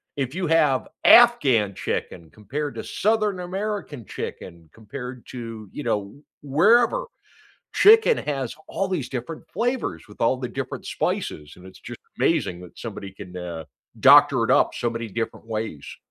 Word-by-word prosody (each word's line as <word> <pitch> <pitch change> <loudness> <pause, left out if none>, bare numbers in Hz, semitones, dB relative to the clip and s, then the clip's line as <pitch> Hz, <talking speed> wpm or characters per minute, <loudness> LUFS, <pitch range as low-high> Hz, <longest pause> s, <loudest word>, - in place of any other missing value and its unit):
if 135 -1 -3
you 185 -3 -2
have 150 -5 +2 0.2
Afghan 135 - +6
chicken 80 -2 -4
compared 140 +8 -5
to - - -5
Southern 210 -2 0
American 185 - -4
chicken 85 -3 -8
compared 125 +3 -9
to, 115 -4 -8
you 150 - -7
know, 105 +8 -3 0.2
wherever, 225 - +3 0.7
chicken 445 +2 +6
has 135 -5 -3
all 195 - -2
these 175 -9 -3
different 140 +6 -6
flavors 230 - -2
with 105 - -14
all 125 +3 +3
the 125 -1 -4
different - - -6
spices, 75 -1 -3
and 90 - -16
it's 95 - -15
just - - -9 0.2
amazing 90 -1 +1
that 90 - -14
somebody 100 -4 -7
can, 95 -2 -11
uh, 85 -3 -6 0.3
doctor - - +7
it - - -1
up - - +3
so 120 - -1
many 115 0 -5
different 115 +2 -5
ways. 110 -9 -5
125 Hz, 155 wpm, -23 LUFS, -, 0.7 s, doctor